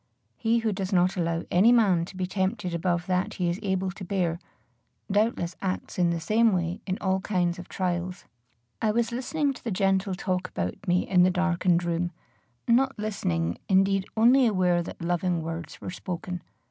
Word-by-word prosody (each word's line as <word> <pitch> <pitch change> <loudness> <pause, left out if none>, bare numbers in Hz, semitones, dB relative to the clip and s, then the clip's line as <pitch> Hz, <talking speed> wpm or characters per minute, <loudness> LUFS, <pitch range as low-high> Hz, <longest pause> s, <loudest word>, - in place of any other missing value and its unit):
He 230 0 +1
who 225 -2 0
does 190 -1 -3
not 185 0 +3
allow 170 -2 -1
any 195 +7 +6
man 195 -8 +4
to 185 - -11
be 185 - -1
tempted 190 0 -2
above 175 0 0
that 185 -1 -1
he 175 -2 0
is 175 - -4
able 190 -2 -1
to 195 +1 -9
bear, 175 -3 -1 0.7
doubtless 205 -4 +1
acts 185 -1 -3
in 175 -1 +4
the 170 -1 -1
same 220 +5 +3
way 175 -1 -1
in 185 0 -1
all 190 0 +1
kinds 180 -2 0
of 180 - -10
trials. 180 -1 -3 0.6
I 220 - +2
was 230 +2 +1
listening 275 +4 -1
to - - -14
the 235 - -3
gentle 195 -1 +1
talk 185 -1 -2
about 90 - -5
me 180 +1 +2
in 180 -2 +4
the 180 - +6
darkened 180 -1 +1
room 175 0 -1 0.6
not 265 +3 +3
listening, 85 - -2
indeed, 195 0 +3
only 245 +3 +6
aware 180 -4 +2
that 170 - -8
loving 175 -1 0
words 165 0 -6
were - - -6
spoken. 180 -1 -5
185 Hz, 185 wpm, -27 LUFS, 175-205 Hz, 0.7 s, any